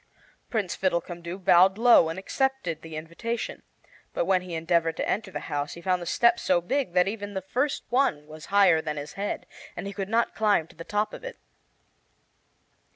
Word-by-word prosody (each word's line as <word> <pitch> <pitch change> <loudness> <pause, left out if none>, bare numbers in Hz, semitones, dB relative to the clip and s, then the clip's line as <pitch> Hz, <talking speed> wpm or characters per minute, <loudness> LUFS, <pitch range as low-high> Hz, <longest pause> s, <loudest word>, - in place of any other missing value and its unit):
Prince 210 -8 -1
Fiddlecumdoo 175 -1 -2
bowed 190 +1 +5
low 235 -8 +6
and 165 - -5
accepted 195 - -1
the 160 -1 -9
invitation, 170 +9 -4 0.5
but - - +1
when 185 0 +3
he 180 -2 -6
endeavored 165 0 +1
to - - -2
enter 205 0 -1
the - - -5
house 145 0 -3
he 170 - -10
found 180 0 0
the 175 - -6
steps 235 +4 +3
so 180 -2 +3
big 185 +3 -1
that 180 0 +4
even 205 -1 -5
the 190 - -1
first 255 +9 -1
one 245 - +1
was 155 0 -11
higher 195 -5 +5
than 150 -1 -4
his 145 0 -6
head, 200 +1 -3 0.3
and - - -5
he 200 - -5
could 195 -1 -4
not 230 +1 +1
climb 210 -7 +2
to - - -19
the 165 - -8
top 210 +4 -1
of - - -9
it. - - -7
185 Hz, 195 wpm, -26 LUFS, 165-215 Hz, 0.5 s, low